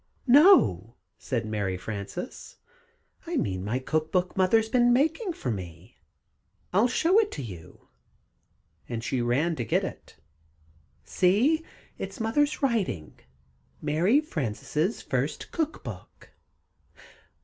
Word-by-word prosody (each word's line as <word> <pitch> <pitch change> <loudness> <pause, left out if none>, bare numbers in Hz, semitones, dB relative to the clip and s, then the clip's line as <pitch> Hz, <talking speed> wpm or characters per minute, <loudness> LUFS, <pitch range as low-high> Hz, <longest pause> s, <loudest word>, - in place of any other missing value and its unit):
"No," 245 - +5 0.2
said 120 -3 -2
Mary 100 -4 -2
Frances, 105 - -7 0.7
"I 340 -1 -2
mean 95 - -1
my 110 +5 -1
cook 155 +4 -2
book 180 0 0
Mother's 220 +4 +3
been 245 +1 +3
making 320 - +1
for 125 - -3
me. 90 +1 -8 0.7
I'll 205 +6 +4
show 335 - +3
it 430 -2 +1
to - - -5
you," 90 -8 -11 1.0
and 115 -2 -4
she 125 0 -1
ran 140 +8 +1
to 120 - -2
get - - +1
it. - - -8 0.9
"See! 235 - +2 0.4
in - - -3
Mother's 290 +7 0
writing 195 - -1 0.6
'Mary 180 - +2
Frances' 155 - -2
First 135 +4 -3
Cook 320 -1 -2
Book!'" - - -10
165 Hz, 115 wpm, -27 LUFS, -, 1.0 s, No